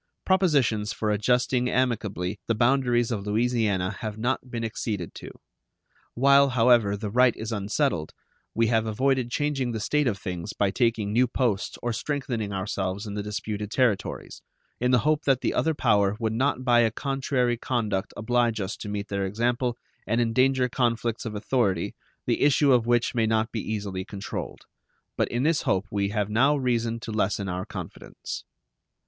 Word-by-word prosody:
Propositions 140 - +2
for 105 -1 -1
adjusting 125 +3 +1
amicably 105 -7 -1
the 115 - +1
boundaries 120 0 +2
of 105 -3 -3
Louisiana 105 -4 0
have 110 -1 -5
not 125 +3 -2
been 115 -1 -4
acceded 105 -5 -3
to. - - -9 0.9
While, 140 +2 +5
however, 115 -4 +4
the 105 0 -5
right 125 +2 +4
is 110 +1 -5
unsettled, 105 - -1 0.4
we 115 - +3
have 110 -1 +1
avoided 130 +2 +1
changing 135 -3 -1
the 110 - -3
state 150 +6 +1
of 105 -5 0
things 90 -3 -5
by 100 -2 +1
taking 110 -2 0
new 125 +3 +4
posts 120 -5 -1
or 120 -1 -1
strengthening 120 -5 -3
ourselves 95 +1 -3
in 105 - -6
the 105 - -3
disputed 105 0 -4
territories, 115 -4 -1 0.4
in 125 - +1
the 125 - +5
hope 155 0 +2
that 135 -2 +3
the - - 0
other 160 -1 +1
power 105 -6 +2
would 110 -2 -1
not 130 +2 0
by 120 -2 +5
a 115 -1 +4
contrary 130 -1 -1
conduct 110 -5 -2
oblige 120 0 +1
us 95 0 -3
to 105 - -7
meet 105 0 -3
their 100 -1 -2
example 120 +4 -1 0.3
and 115 +2 +1
endanger 125 +2 +2
conflicts 120 -2 -1
of 110 -2 -4
authority, 105 -5 0 0.3
the - - 0
issue 145 -1 +4
of 120 -2 +2
which 120 -1 +2
may 115 -2 +1
not 110 +1 +1
be 110 - -3
easily 100 -3 -4
controlled. 100 -1 -6 0.5
But - - +1
in 120 +2 -2
this 160 +1 +2
hope 95 +1 0
we 100 -1 0
have 105 -1 -1
now 130 +8 +3
reason 120 -3 0
to 115 - -6
lessen 100 -2 0
our 90 0 -4
confidence. - - -7
115 Hz, 170 wpm, -26 LUFS, 105-125 Hz, 0.9 s, While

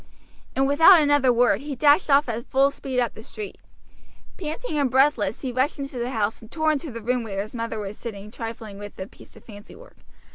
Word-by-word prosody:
And 270 - +2
without 325 +6 +7
another 290 -4 +3
word 245 +2 +3
he 290 -1 -5
dashed 295 +5 +4
off 280 +1 +4
at 235 0 -4
full 275 +1 +3
speed 265 -2 -3
up 240 -2 0
the - - -11
street. 415 - -8 0.8
Panting 310 +1 -4
and 275 -2 +2
breathless 255 -6 +2
he 260 - -3
rushed 260 +6 0
into 275 -3 -6
the 240 +1 -2
house, 220 -3 -2
and 225 - -14
tore 315 -1 +1
into 305 +1 -3
the 230 -3 -8
room 250 +2 0
where 200 -3 -5
his 215 - -12
mother 230 -1 -4
was 205 0 -6
sitting 210 -2 -8
trifling 225 -3 -7
with 205 0 -10
a 190 - -5
piece - - -17
of - - -17
fancy 205 -1 -12
work. - - -16
250 Hz, 220 wpm, -24 LUFS, 225-290 Hz, 0.8 s, without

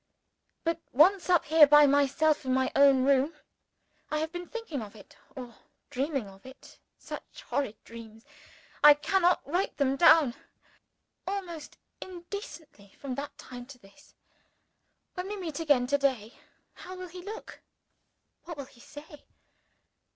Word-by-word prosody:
But 330 0 -1
once 360 +8 +4
up 350 -2 +3
here 310 0 +7
by 295 +1 +7
myself 285 +2 +2
in 260 -1 0
my 260 0 0
own 275 -2 +5
room, 280 +3 +2 0.7
I 305 - -1
have 315 +1 -2
been 350 0 -7
thinking 455 - -6
of 210 0 -10
it, 205 - -16 0.2
or 245 -3 -8 0.4
dreaming 270 -3 -2
of 195 0 -16
it 260 +1 -15 0.2
(such - - -10
horrid 270 -7 -2
dreams 225 0 -13 0.6
I 295 0 +9
cannot 355 +4 +1
write 355 +5 -2
them 270 -2 +1
down!) 315 -6 +6 0.9
almost 360 -6 -6 0.2
incessantly 345 - -10
from 275 -2 -5
that 280 +2 -6
time 245 -1 -10
to 275 -1 -12
this. 200 +6 -21 1.0
When 365 0 -5
we 415 +1 -5
meet 330 -6 -5
again 290 -6 +2
to 285 +3 0
day 250 -6 -1 0.4
how 370 - -10
will 365 -1 -8
he 360 +1 -10
look? 425 +5 -9 0.8
what 340 -2 -8
will 280 - -6
he 260 -2 -21
say? 295 +3 -13
290 Hz, 145 wpm, -28 LUFS, 260-340 Hz, 1.0 s, I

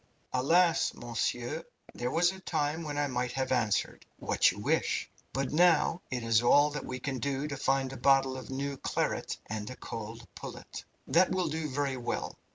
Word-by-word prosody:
"Alas, 165 +6 +3
monsieur, 120 +5 -2 0.3
there 120 +1 -2
was 175 +6 +3
a 190 - -10
time 155 -3 -1
when 150 -3 -4
I 145 - +2
might 125 -2 -2
have 130 -1 -1
answered, 115 -5 +1
'What - - +3
you - - -10
wish!' - - 0 0.2
but 135 -1 -1
now 170 +1 +4
it 125 -2 -3
is 115 0 +4
all 145 +5 +5
that 150 - -5
we 130 0 -5
can 130 0 -3
do 140 +2 -1
to 145 - -4
find 135 0 0
a - - -7
bottle 135 -1 +4
of 130 - -8
new 140 +1 -3
claret - - -1
and 105 -1 -4
a 130 - -7
cold 115 0 -7
pullet." - - -8 0.2
"That 170 +7 +4
will 180 -2 0
do 155 0 -2
very 140 -1 -1
well. 120 - -3
135 Hz, 185 wpm, -30 LUFS, 125-150 Hz, 0.3 s, all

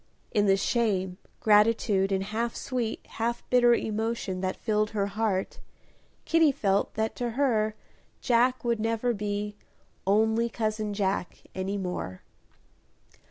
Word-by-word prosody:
In 205 -1 +2
the 195 0 +5
shame, 190 -5 0 0.2
gratitude, 210 -2 +3
and 190 0 +1
half 225 +3 -2
sweet, 245 -4 -3
half 235 +1 -3
bitter 240 -1 +6
emotion 220 -4 -2
that 185 0 -1
filled 215 -1 0
her 205 -2 -1
heart, 200 -2 -1 0.7
Kitty 325 -3 +4
felt 200 -6 0
that 220 0 -1
to 245 -1 -1
her 220 -6 +2 0.4
Jack 250 +1 +2
would 235 -2 0
never 230 +2 0
be 205 0 -3 0.5
"only 220 +3 +3
cousin 215 -2 -2
Jack" 195 -3 -2
any 190 +2 -2
more. 180 - -4
215 Hz, 125 wpm, -28 LUFS, 200-235 Hz, 0.7 s, bitter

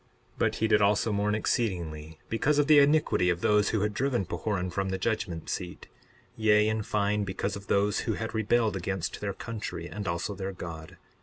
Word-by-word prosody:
62:2 - - -20
But - - +1
he 110 - +1
did 105 -1 +4
also 105 +2 +3
mourn 105 +1 +1
exceedingly 80 -9 -2
because 145 +6 +1
of 145 - +4
the 150 0 +7
iniquity 145 -10 +3
of 85 -1 0
those 105 -1 +3
who 110 - 0
had 105 0 0
driven 125 -4 0
Pahoran 90 +1 -2
from 95 +2 -2
the 95 - -1
judgment 95 -5 -2
seat, 90 -2 -5 0.5
yea, 105 -1 +4
in 110 0 0
fine 105 0 0
because 100 +1 -3
of 100 0 -9
those 100 +1 +2
who 110 - -1
had 110 +2 -4
rebelled 110 0 +1
against 95 -1 -3
their 100 -1 -2
country 110 -7 -6
and 100 +3 -6
also 85 +4 -2
their 95 0 -5
God. 85 -1 -8
100 Hz, 200 wpm, -28 LUFS, 90-110 Hz, 0.5 s, the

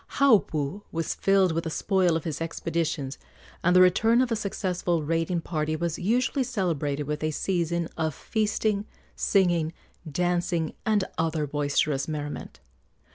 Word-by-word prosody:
Haupu 195 - +3
was 165 0 -2
filled 195 -2 +3
with 165 +1 -2
the - - -1
spoil 185 0 +2
of 165 - -6
his 160 -3 -4
expeditions, 165 -4 -2 0.4
and 180 +1 +4
the 185 - +8
return 220 +6 +5
of 255 -1 +2
a - - +2
successful 180 -5 -1
raiding 165 +2 0
party 155 -2 -2
was 170 0 -2
usually 250 +8 +1
celebrated 165 - -1
with 150 +1 -4
a 155 - +1
season 170 0 -1
of 160 -3 -1
feasting, 215 -1 -1 0.3
singing, 175 -5 +2 0.4
dancing, 175 0 0
and 210 -2 +3 0.2
other 160 -2 0
boisterous 145 -1 0
merriment. 145 - -5
170 Hz, 140 wpm, -26 LUFS, 155-190 Hz, 0.4 s, the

